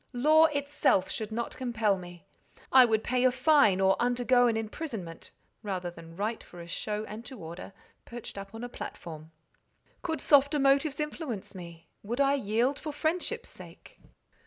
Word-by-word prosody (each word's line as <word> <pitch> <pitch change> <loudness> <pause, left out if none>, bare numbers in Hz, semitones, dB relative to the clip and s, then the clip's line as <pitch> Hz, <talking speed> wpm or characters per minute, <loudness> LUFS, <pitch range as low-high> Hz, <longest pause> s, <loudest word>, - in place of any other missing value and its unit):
Law 310 +6 +5
itself 285 -10 +1
should 220 -1 -4
not 235 +2 -3
compel 230 -5 +1
me. 175 0 -11 0.5
I 260 -1 +8
would 220 -2 +1
pay 250 0 0
a 255 - +5
fine, 255 -7 +4
or 190 0 +4
undergo 245 0 +3
an 225 -2 +1
imprisonment, 220 - -6 0.3
rather 185 -4 -3
than 165 -1 -13
write 215 +4 -3
for 175 - -13
a 170 - -8
show 210 +5 -3
and 215 +2 -8
to 260 - -9
order, 170 +1 -8 0.3
perched 240 -1 -9
up 195 +2 -8
on 225 - -7
a - - -3
platform." 160 -9 -8 0.7
"Could 320 -2 -2
softer 285 +1 +4
motives 275 +2 +2
influence 300 - -4
me? 170 -3 -10
Would 235 +5 -4
I 275 0 +4
yield 250 +2 0
for 305 - -5
friendship's 345 +10 -2
sake?" - - -14
235 Hz, 165 wpm, -29 LUFS, 195-275 Hz, 0.7 s, I